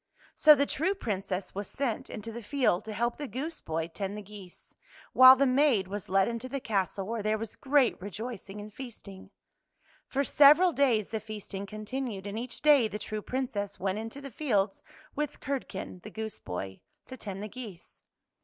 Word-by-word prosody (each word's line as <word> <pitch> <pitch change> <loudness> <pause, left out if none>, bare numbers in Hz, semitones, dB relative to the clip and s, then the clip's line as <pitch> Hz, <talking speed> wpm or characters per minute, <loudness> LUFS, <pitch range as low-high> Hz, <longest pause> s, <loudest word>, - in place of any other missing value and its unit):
So 305 -1 +8
the 280 0 +2
true 370 +8 0
Princess 195 - -3
was 200 0 -4
sent 265 -1 -2
into 225 0 -6
the 235 +1 -7
field 240 -6 +1
to 220 - -5
help 235 +3 -1
the 295 - -5
goose 280 +8 -4
boy 160 0 -2
tend 195 +4 -5
the 210 - -7
geese, 200 -3 -13 0.4
while 255 0 +10
the 275 +1 +3
maid 255 -7 +3
was 200 0 -6
led 195 0 +4
into 235 +2 -4
the 275 +1 -3
castle 195 -4 -1
where 225 +2 -3
there 215 +1 +1
was 220 0 -6
great 275 -7 +2
rejoicing 205 +1 -6
and 210 0 -9
feasting. 215 -7 -10 0.8
For 275 +1 0
several 300 +6 +6
days 240 -8 +2
the 220 - -2
feasting 210 -2 -7
contin 215 +6 -4
ued, 195 -3 -7
and 205 +2 -4
each 245 +4 -7
day 290 -6 +6
the 210 - -5
true 215 0 -5
Princess 220 -6 -3
went 190 +2 -1
into 225 +5 -6
the 275 -1 -8
fields 210 -7 0 0.3
with 300 -1 -3
Curdken, 230 -9 -5
the 215 - -9
goose 220 0 -6
boy, 95 +2 -6 0.2
to 260 - -9
tend 200 -5 -6
the - - -4
geese. 215 -6 -10
220 Hz, 190 wpm, -29 LUFS, 200-265 Hz, 0.8 s, while